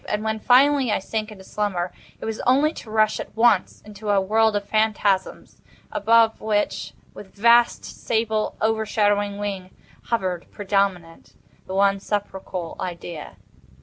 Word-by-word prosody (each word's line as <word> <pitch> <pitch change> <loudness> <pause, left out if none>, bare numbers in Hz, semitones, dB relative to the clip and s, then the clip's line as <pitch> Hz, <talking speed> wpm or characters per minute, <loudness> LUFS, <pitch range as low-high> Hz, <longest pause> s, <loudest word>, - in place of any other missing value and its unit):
And 210 +1 -1
when, 220 0 -2
finally, 265 +1 +4
I - - +2
sank 215 +2 -4
into 195 -3 -12
slumber, 185 -3 -2 0.3
it - - -7
was 220 -1 -4
only 280 +5 +3
to 225 - -10
rush 215 0 +2
at - - -8
once 225 -5 +3
into 210 0 -8
a 200 -1 +4
world 220 +3 +2
of 200 -1 -2
phantasms, 210 -3 0 0.3
above 225 +1 +3
which, 210 -1 -1 0.2
with 195 - -13
vast, 235 +3 +4
sable, 220 -1 -2
overshadowing 205 -2 +1
wing, 195 -3 -4 0.4
hovered, 185 -7 -2
predominant, 195 -4 -2 0.3
the 190 - -5
one 195 0 +3
sepulchral 190 -4 -4
Idea. 170 -3 -6
210 Hz, 140 wpm, -23 LUFS, 195-220 Hz, 0.4 s, finally